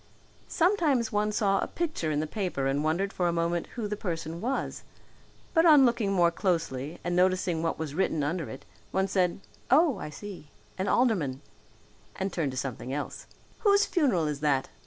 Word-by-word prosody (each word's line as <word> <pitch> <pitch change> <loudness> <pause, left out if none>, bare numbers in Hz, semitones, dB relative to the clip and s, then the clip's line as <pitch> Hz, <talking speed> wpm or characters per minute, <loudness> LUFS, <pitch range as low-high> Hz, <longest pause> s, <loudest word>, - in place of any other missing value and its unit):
Sometimes 320 - +2
one 210 0 +1
saw 200 -2 +2
a - - -1
picture 315 - -2
in 150 -1 0
the - - -1
paper 175 -6 -2
and 140 +2 0
wondered 175 +6 0
for 180 - 0
a - - +2
moment 170 0 -1
who 230 -4 -2
the 210 - -2
person 165 -4 -4
was; 260 +4 -2 0.7
but 325 - +5
on 300 -5 +7
looking 235 -4 +1
more 175 -3 +4
closely 165 -5 -2
and 175 0 -1
noticing 180 -2 +2
what 165 0 -1
was 155 -3 -4
written 160 -3 0
under 165 +2 -2
it, 135 - -9 0.2
one 190 0 0
said, 185 -1 0 0.3
"Oh, 295 +1 +4
I - - -5
see, 190 0 -9 0.3
an 190 +1 -2
alderman," 180 - +1 0.7
and 190 -1 -3
turned 160 -5 0
to 130 - -6
something 130 -1 -4
else. 145 +2 -5 0.3
"Whose 405 -1 +4
funeral 255 - +1
is 150 -2 -2
that?" 140 -3 +1
180 Hz, 180 wpm, -28 LUFS, 155-215 Hz, 0.7 s, on